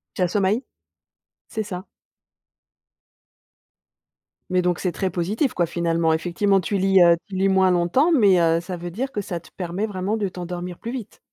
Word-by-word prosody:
Tu - - -3
as 180 - +4
sommeil? 205 +6 +1 0.9
C'est 220 - -3
ça. 185 -2 -6 2.7
Mais 180 -1 +2
donc 180 -1 0
c'est 180 - -1
très 190 +1 -2
positif, 200 - -1
quoi, 175 -2 +1
finalement. 165 -1 0
Effectivement, 180 +5 +1
tu 195 +3 -1
lis, 195 -1 +4
heu, 170 0 +6
tu 195 - -8
lis 195 +1 +2
moins 190 -1 +4
longtemps, 180 - +2
mais 205 - +5
heu, 165 0 +3
ça 180 +1 -6
veut 175 +1 -6
dire 250 +10 -4
que 205 - -3
ça 185 -3 -5
te 170 - -18
permet 180 +3 -3
vraiment 200 +1 -2
de 205 -2 -1
t'endormir 180 -1 -6
plus 235 - -5
vite? 240 -5 -7
185 Hz, 180 wpm, -23 LUFS, 175-205 Hz, 2.7 s, heu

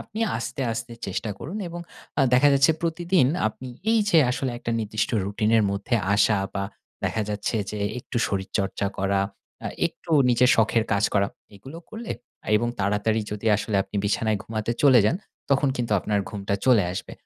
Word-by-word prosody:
আপনি 220 0 -7 0.2
আস্তে, 125 +3 -5
আস্তে 115 +1 -5
চেষ্টা 100 +3 -3
করুন 175 +8 -6
এবং 170 +1 -6 0.4
আ - - +5
দেখা 135 +3 +6
যাচ্ছে 140 +3 +5
প্রতিদিন 170 -2 +2 0.2
আপনি 130 +4 -9 0.2
এই 225 - +4
যে 165 - +6
আসলে 130 +1 -1
একটা 120 - -4
নির্দিষ্ট 110 -1 -1
রুটিন 105 +2 0
এর 110 - +4
মধ্যে 100 +5 -2 0.2
আসা 105 +1 +4 0.2
বা 100 -1 -1 0.4
দেখা 110 - 0
যাচ্ছে 105 +2 -2
যে 105 - -5 0.2
একটু 125 - -7
শরীরচর্চা 100 0 -2
করা, 100 0 +1 0.4
আ - - -1 0.2
একটু - - -12 0.2
নিজের 125 +1 +4
শখের 115 0 +3
কাজ 100 +1 +2
করা, 100 -1 +3 0.3
এগুলো 135 - -10
করলে 225 +1 -5 0.4
এবং 120 +2 0
তাড়াতাড়ি 105 +3 +1
যদি 105 +2 -5
আসলে 105 0 -2
আপনি 105 - -8
বিছানায় 105 +1 +1
ঘুমাতে 110 +1 -3
চলে 130 -4 +7
যান, 160 - +2 0.3
তখন 140 +1 +3
কিন্তু 120 -3 -1
আপনার 105 +1 0
ঘুমটা 100 -2 -2
চলে 120 -7 +5
আসবে। 90 - -6
110 Hz, 175 wpm, -25 LUFS, 100-130 Hz, 0.4 s, চলে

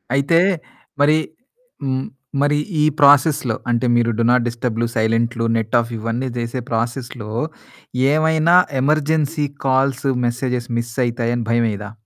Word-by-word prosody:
అయితే 140 +5 +3 0.6
మరి 150 +2 +5 0.7
హ్మ్, 130 -1 -1 0.4
మరి 145 +1 +2 0.2
ఈ - - +4 0.2
ప్రాసెస్‌లో 140 -4 +4
అంటే 120 +1 +1
మీరు 120 0 +2
డు 115 - +2
నాట్‌ 125 -1 +3
డిస్టర్బ్‌లు, 115 -1 -2
సైలెంట్లు 115 +1 0
నెట్ 115 +2 -2
ఆఫ్ 115 0 -3
ఇవన్నీ 115 +4 -3
చేసే 120 +2 -3
ప్రాసెస్‌లో 120 -1 -3 0.8
ఏమైనా 160 +2 +3 0.3
ఎమర్జెన్సీ 155 +1 +1 0.2
కాల్స్, 135 +1 +1 0.2
మెసేజెస్ 125 0 -3
మిస్ 115 0 -5
అయితాయని 120 -1 -2
భయమేయదా? 110 -3 -1
125 Hz, 120 wpm, -19 LUFS, 115-140 Hz, 0.8 s, మరి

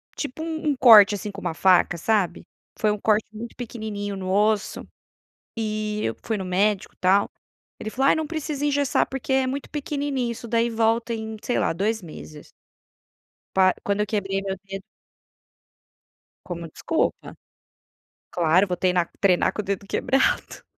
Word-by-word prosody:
tipo 290 +1 -5
um 320 -1 -2
um 290 - +1
corte, 220 -5 +8
assim, 205 +1 -5
com 200 - -9
uma - - -2
faca, 180 -1 +3
sabe? 200 +1 0 0.3
Foi 215 - +2
um 210 - -3
corte 215 +1 +2
muito 230 +2 -8
pequenininho 215 -4 -5
no 185 -1 -5
osso, 210 +1 +1 0.7
e 215 -1 -2
eu 115 - -2
fui 220 - -2
no 190 - -4
médico 195 +2 0
tal, 190 +2 +3 0.5
ele 215 - -5
falou: 270 +4 +1
"Ai - - +6
não 315 -1 -2
precisa 300 -3 -3
engessar 285 -2 +2
porque 270 0 -4
é 265 0 +3
muito 270 +2 -4
pequenininho 280 -4 -2
isso 235 - -9
daí 235 +1 +1
volta 230 +1 +1
em, 220 0 -5
sei 245 - 0
lá, - - +1
2 210 +6 -1
meses". 155 -2 -11 1.0
Pá, 185 -1 +5
quando 200 +1 0
eu - - +1
quebrei 195 -2 -1
meu 195 -1 -3
dedo 195 0 -7 1.6
como 170 -2 -6
desculpa, 325 - -2 1.0
claro 175 +3 +3
vou 180 -2 -2
treinar 180 -1 +1
treinar 185 -3 +3
com - - -3
o - - -14
dedo 200 0 -3
quebrado? 265 +6 0
215 Hz, 160 wpm, -24 LUFS, 195-245 Hz, 1.6 s, corte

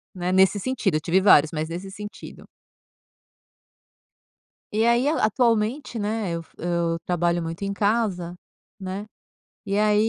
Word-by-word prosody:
né, 180 0 -2
nesse 190 +2 +4
sentido, 220 -6 -1
eu 155 - 0
tive 170 +4 +2
vários, 160 -6 +6
mas 155 0 -3
nesse 180 +3 -6
sentido. 205 +1 -10 2.3
E 220 +2 +3
aí 240 +3 +3
a 310 +2 +1
atualmente, 230 +2 0
né 210 -2 -2
eu 170 0 -3
f 165 - -21
eu 170 -1 -1
trabalho 175 -1 0
muito 165 +2 -6
em 200 - -1
casa, 200 -4 0 0.5
né, 190 +2 -5 0.6
e 200 +1 -1
aí 210 +1 +3
195 Hz, 145 wpm, -24 LUFS, 175-215 Hz, 2.3 s, vários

